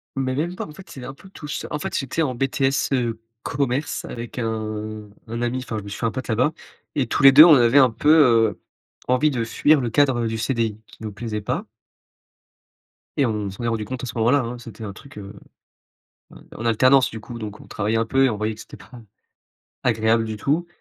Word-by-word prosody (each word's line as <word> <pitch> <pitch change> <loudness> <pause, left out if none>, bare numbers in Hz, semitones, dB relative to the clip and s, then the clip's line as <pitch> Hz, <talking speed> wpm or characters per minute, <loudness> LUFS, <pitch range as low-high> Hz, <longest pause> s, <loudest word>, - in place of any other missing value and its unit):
Mais 130 -1 -1
même 170 +6 -2
pas, - - -5
en 150 - -12
fait, 190 +5 -14
c'est 130 - -9
un 135 - -7
peu 175 +7 -16
tout 155 -5 -10
c 145 - -4
En 150 - -2
fait - - -4
j'étais 135 +4 -2
en 135 -5 0
BTS, 135 +1 0
heu, 120 -3 -1 0.2
commerce, 140 +1 -2
avec 120 +1 -8
un 110 -2 -4 0.2
un 115 +1 -4
ami, 120 +1 -1
enfin, 120 -3 -5
je 105 - -5
me 100 - -9
suis 100 - -7
fait 115 - -2
un 115 - +1
pote 130 +2 -5
là-bas, 125 +6 +2 0.4
et 135 -5 0
tous 120 - -1
les 135 - +10
2, 150 +4 +10
on 160 -4 +8
avait 120 +1 +4
un 130 -2 +7
peu, 145 +6 0
heu, 120 -9 +5 0.5
envie 130 +4 +3
de 120 -3 -1
fuir 150 +6 +3
le 120 - -1
cadre, 130 +2 +3
heu, - - 0
du 115 0 -3
CDI, 110 -3 -1
qui - - -17
nous 110 - -4
plaisait 105 +1 -5
pas. - - -3 1.5
Et 140 - +3
on 105 -4 -2
s'en 95 +5 -8
est - - 0
rendu 115 -2 -1
compte 130 +4 -6
à - - -3
ce 115 - -6
moment-là, 120 +6 +3
hein, 120 0 -5
c'était 115 -2 -10
un 100 -2 -6
truc, 135 +4 -15
heu, 100 -1 -8 1.0
en - - -14 0.2
en 115 - -5
alternance, 130 +4 +4
du 110 - -8
coup, 120 +2 -9
donc 105 -1 -7
on - - -15
travaillait 110 +2 -1
un 115 - +1
peu 135 +3 +3
et - - +3
on 110 - -3
voyait 110 +1 -2
que - - -11
c'était - - -12
pas - - -17 0.9
agréable 115 -1 +2
du 110 -1 -5
tout. 160 +9 0
120 Hz, 240 wpm, -22 LUFS, 110-135 Hz, 1.5 s, les